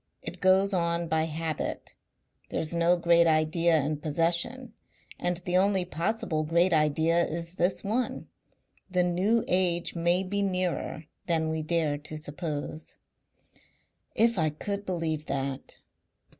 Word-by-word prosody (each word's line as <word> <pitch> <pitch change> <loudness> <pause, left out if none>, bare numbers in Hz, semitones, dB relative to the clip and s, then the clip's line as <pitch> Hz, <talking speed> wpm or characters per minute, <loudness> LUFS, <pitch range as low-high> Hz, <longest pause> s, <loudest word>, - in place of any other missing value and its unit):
It - - -7
goes 190 +1 +4
on 170 -1 0
by 160 0 +1
habit. 160 -1 -4 0.6
There's 160 +1 -3
no 170 +1 +3
great 170 0 +4
idea 160 +1 +3
in 150 +2 -1
possession 170 - -1 0.5
and 175 0 0
the 180 0 +2
only 190 -1 +2
possible 170 -2 -1
great 170 +3 +2
idea 160 +2 +3
is 165 +1 -4
this 180 +1 0
one. 230 +5 -2 0.6
The 180 -1 +2
New 190 +6 +2
Age 175 -2 +1
may 175 +2 +2
be 200 +2 -2
nearer 185 -4 -1 0.2
than 160 -2 +1
we 160 0 -2
dare 155 -2 0
to 155 +1 -8
suppose." 155 0 -5 1.2
"If 230 -3 +3
I 155 -1 +3
could 200 +7 -5
believe 160 -4 -2
that!" 135 0 -4
170 Hz, 130 wpm, -28 LUFS, 155-185 Hz, 1.2 s, goes